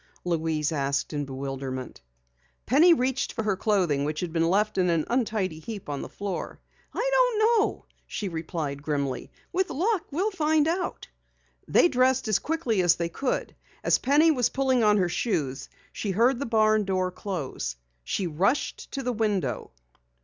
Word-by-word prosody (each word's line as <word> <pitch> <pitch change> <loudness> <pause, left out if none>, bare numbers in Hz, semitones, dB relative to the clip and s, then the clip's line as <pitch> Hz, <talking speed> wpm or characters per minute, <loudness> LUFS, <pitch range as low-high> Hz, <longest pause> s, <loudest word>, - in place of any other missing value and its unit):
Louise 160 -3 0
asked 140 0 -1
in 145 -1 -2
bewilderment. 135 - -5 0.6
Penny 310 +8 +6
reached 260 -4 +1
for 225 - -2
her 210 -2 +1
clothing 185 -9 +1
which 150 +3 -2
had 175 -3 -4
been 165 0 +2
left 210 +2 +1
in 180 -1 +3
an 165 -3 +1
untidy 215 -9 0
heap 205 +3 -7
on 140 -1 -3
the - - -7
floor. 200 -2 -5 0.3
"I - - -1
don't - - +3 0.2
know," - - -2 0.2
she 205 - -4
replied 160 -4 -4
grimly. 140 -3 -2 0.2
"With 375 +1 +1
luck 375 +4 0
we'll 375 +9 0
find 310 -4 +2
out." 360 +3 -2 0.6
They - - +5
dressed 260 -3 +2
as 215 - +2
quickly 275 - 0
as 175 -1 +4
they 170 0 -2
could. 255 +10 -2 0.3
As - - +3
Penny 295 +5 +4
was 250 -6 +2
pulling 260 -3 +1
on 210 -1 +5
her 185 -3 +2
shoes 150 - -2 0.2
she 210 - -4
heard 235 +6 +3
the 280 - -3
barn 215 -1 +3
door 185 -1 0
close. 155 - -4 0.3
She 185 - -2
rushed 180 - -1
to 270 - -3
the 250 0 -1
window. 205 - -1
200 Hz, 165 wpm, -26 LUFS, 160-260 Hz, 0.6 s, Penny